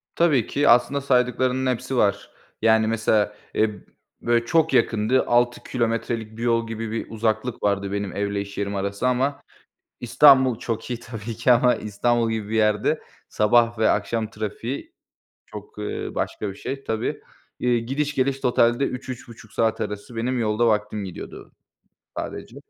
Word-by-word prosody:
Tabii 150 -9 +3
ki, 145 +1 +2
aslında 130 +4 +4
saydıklarının 130 0 +1
hepsi 125 +2 -4
var. 100 -3 +1 0.3
Yani 110 0 +4
mesela, 110 -2 +1 0.2
eee, 110 - +2 0.5
böyle, 120 0 +1
çok 160 +3 +2
yakındı. 120 0 +2
6 120 0 +2
kilometrelik 115 -2 -2
bir 115 - -5
yol 115 -1 +1
gibi 115 -1 -5
bir 115 - -4
uzaklık 110 +2 -2
vardı 100 -1 0
benim 100 -2 -3
evle 100 0 -1
iş 100 0 -9
yerim 100 0 -2
arası. 100 +4 -1
Ama 130 +3 0 0.6
İstanbul 130 0 +5
çok 115 0 -4
iyi 120 -2 -3
tabii 115 -1 -7
ki, 120 +3 +3
ama 125 +1 +4
İstanbul 115 +2 0
gibi 110 -2 -3
bir 110 - -2
yerde 105 +7 +2 0.3
sabah 115 +2 +3
ve 110 - +4
akşam 115 -2 0
trafiği 110 +5 -5 0.5
çok, 105 0 -11
ııı, 105 - -4
başka 105 - -3
bir - - -9
şey 135 +6 -6
tabii. 110 0 -2 0.4
İii, 120 -2 +1
gidiş 145 +3 -1
geliş 135 0 0
totalde 120 0 +3
3-3.30 125 -4 -7
saat 115 -1 0
arası 105 +3 -5
benim 125 +3 -1
yolda 110 +1 +1
vaktim 105 -1 0
gidiyordu 95 -3 -9 0.7
sadece. - - -6
115 Hz, 155 wpm, -23 LUFS, 105-125 Hz, 0.7 s, İstanbul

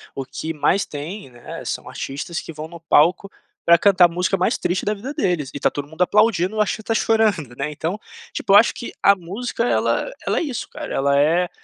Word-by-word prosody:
o 135 - -3
que 160 +4 -5
mais 175 +6 +1
tem, 150 +1 -7
né, 120 -1 -9
são - - -4
artistas 145 +5 -5
que 165 - -9
vão 155 +1 -7
no 170 +1 -11
palco 165 +4 +3 0.4
pra 170 0 +7
cantar 185 0 +5
a - - +6
música 180 +3 -1
mais 185 +7 +1
triste 180 +3 -1
da 210 - +1
vida 235 +8 -6
deles, 175 - -1
e - - -5
tá - - +2
todo 145 0 -5
mundo 160 +3 -9
aplaudindo, 210 0 +3
ou, 215 - +2
acho, 210 - -1
até 225 - -1
chorando, 210 - +1
né. 140 +4 -3
Então, 165 +7 -3 0.3
tipo, 195 - 0
eu - - +10
acho 225 - +5
que 240 - -7
a 200 - +6
música 200 +7 -4
ela - - 0 0.2
ela - - +1
é - - -2
isso 275 -7 -4
cara, - - -7
ela 140 +1 +2
é: 170 +5 +2
180 Hz, 225 wpm, -21 LUFS, 150-205 Hz, 0.4 s, eu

